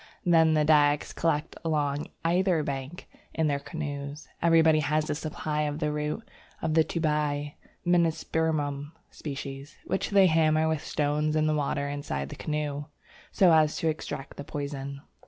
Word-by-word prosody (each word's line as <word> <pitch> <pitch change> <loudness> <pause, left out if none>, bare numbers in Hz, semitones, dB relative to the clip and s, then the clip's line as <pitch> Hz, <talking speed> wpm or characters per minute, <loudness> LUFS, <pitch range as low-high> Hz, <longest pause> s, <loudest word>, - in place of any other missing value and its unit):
Then 160 -2 +5
the 150 -1 +3
Dyaks 150 -1 +3
collect 160 -2 0
along 150 -2 0 0.2
either 175 -1 +2
bank 140 +4 -5 0.3
in 160 - +1
their 145 -2 +1
canoes. 145 -1 -6
Everybody 160 -2 +5
has 155 +1 +1
a - - +2
supply 150 0 -3
of 150 -1 -1
the 150 -1 -1
root 150 +9 -3 0.3
of 160 - -1
the 160 0 +5
tubai 150 -3 -1 0.3
(Menispermum 160 -4 0 0.2
sp.), 140 -3 -6 0.5
which - - -1
they 200 -2 +6
hammer 160 -2 +3
with 160 -2 -1
stones 150 +1 0
in 155 0 +2
the 155 - +2
water 140 -1 -1
inside 140 - -4
the - - -7
canoe, 150 -1 -3 0.5
so 180 -4 +5
as 155 -1 +4
to 165 - +1
extract 145 -3 -5
the 145 - -5
poison. 140 -1 -5
150 Hz, 155 wpm, -28 LUFS, 145-160 Hz, 0.5 s, they